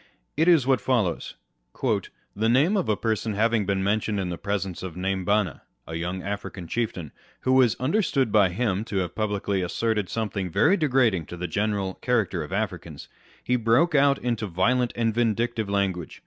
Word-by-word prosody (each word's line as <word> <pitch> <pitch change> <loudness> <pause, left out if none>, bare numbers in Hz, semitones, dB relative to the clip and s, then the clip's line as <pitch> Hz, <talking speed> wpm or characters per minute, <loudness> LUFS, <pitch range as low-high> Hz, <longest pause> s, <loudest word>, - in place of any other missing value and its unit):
It 160 +3 +2
is 165 -7 +5
what 130 -4 +2
follows: 105 -10 0 0.4
â€" - - -1 0.2
" - - -44
The 110 - +3
name 145 - +3
of 190 - 0
a 105 - +2
person 110 +2 -1
having 110 -1 +1
been 95 -1 0
mentioned 105 +1 0
in 95 -2 -2
the 85 - -4
presence 100 -3 -3
of 90 -3 -6
.Naimbanna 95 0 0 0.2
(a 80 - -8
young 90 +3 -3
African 100 -3 -5
chieftain), 95 -8 -3 0.3
who 130 - +1
was 125 -4 +4
understood 135 - +1
by 100 -3 +5
him 100 +1 -1
to 100 - -4
have 90 -2 -1
publicly 100 -2 -1
asserted 105 +2 -1
something 105 -4 -2
very 180 - +3
degrading 125 - +2
to 90 - -8
the 90 - -4
general 100 +1 -1
character 105 -8 0
of 75 - -7
Africans, 90 -7 -4 0.3
he 125 - +1
broke 120 +9 +3
out 140 -1 +4
into 115 -3 -2
violent 120 +8 +1
and 115 -2 0
vindictive 115 -1 0
language. 95 -4 -2
105 Hz, 180 wpm, -25 LUFS, 95-120 Hz, 0.4 s, is